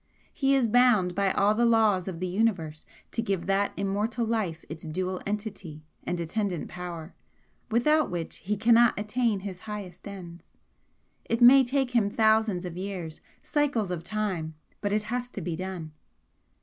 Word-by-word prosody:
He 275 -2 +2
is 260 -4 +3
bound 220 -6 +4
by 195 +1 +1
all 205 +1 +3
the 235 +2 +1
laws 220 -6 +3
of 175 -3 -5
the 185 - -2
Universe 180 -6 -1 0.2
to 230 - -1
give 195 -6 -2
that 195 +2 +1
immortal 210 +4 -1
life 210 -8 -2
its 160 0 -8
dual 185 +3 -3
entity 200 -7 -5 0.2
and 175 - -2
attendant 180 +1 -2
power, 175 -2 -7 0.6
without 300 +7 +3
which 175 -3 -4
he 210 +2 -3
cannot 235 +2 +5
attain 215 -1 0
his 190 -2 -6
highest 205 -3 -8
ends. 180 -4 -10 0.7
It 230 - -1
may 265 +3 +8
take 265 0 0
him 230 -5 +2
thousands 220 -4 +2
of 175 -1 -6
years 185 -4 -5 0.2
cycles 275 -10 0
of 170 -2 -3
time, 180 -6 -3 0.3
but 205 - -1
it 210 0 +1
has 245 +3 -3
to 210 - -7
be 170 -2 -3
done. 180 -3 -5
200 Hz, 160 wpm, -27 LUFS, 180-225 Hz, 0.7 s, may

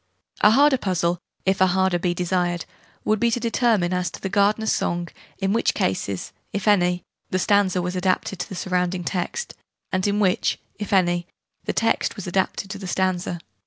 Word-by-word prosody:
A 210 - +7
harder 270 +3 +5
puzzle 175 -4 0 0.3
if 190 0 +1
a 190 - +7
harder 190 -1 +2
be 175 0 0
desired 175 -1 0 0.4
would 215 0 +2
be 235 - +3
to 235 - 0
determine, 230 -6 +2
as 180 0 0
to - - -10
the 190 - -3
Gardener's 210 +2 +2
Song, 175 0 -1 0.3
in 195 0 0
which 230 - +1
cases 95 0 -2 0.2
(if 200 +1 -3
any) 180 -3 +3 0.3
the 185 - 0
stanza 190 -1 +2
was 180 +1 -3
adapted 185 0 0
to 180 - -4
the 190 - -6
surrounding 180 0 -1
text, 185 - -3 0.4
and 185 +1 +1
in 205 +1 +1
which 185 -3 +2 0.2
(if 210 +1 -5
any) 175 -3 +2 0.4
the - - -1
text 225 - +1
was 200 - -7
adapted 190 +1 -1
to 200 - -6
the 190 - -6
stanza. 180 -1 -1
185 Hz, 185 wpm, -23 LUFS, 180-205 Hz, 0.4 s, A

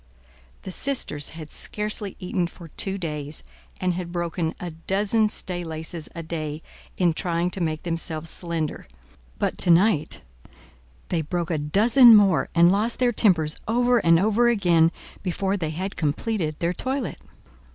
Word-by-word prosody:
The 190 - -6
sisters 185 - 0
had 155 -2 -9
scarcely 210 -1 -3
eaten 180 -1 -1
for 170 -1 -12
two 195 +5 -2
days, 150 -4 -5 0.4
and 180 -1 0
had 175 -1 -5
broken 170 -1 -2
a 175 -1 -5
dozen 200 +6 0
staylaces 165 -4 -4
a 170 - -5
day, 155 -1 -5 0.3
in 175 -3 +3
trying 170 +1 -1
to 190 - -3
make 155 -2 -2
themselves 165 -1 -2
slender; 165 - -3 0.5
but - - -2
to - - 0
night 170 - +3 0.9
they 170 - 0
broke 170 +2 -3
a 160 - 0
dozen 225 - +6
more, 195 -5 +4
and 170 +1 +6
lost 215 +4 +1
their 245 -1 +2
tempers 165 -9 +3
over 245 +2 +3
and 165 -3 +4
over 220 +5 +3
again 175 -7 +3 0.3
before 190 +1 -1
they 165 -6 -2
had 185 +5 -4
completed 155 +1 -1
their 170 +1 -1
toilet. 265 +8 -3
175 Hz, 150 wpm, -24 LUFS, 160-200 Hz, 0.9 s, dozen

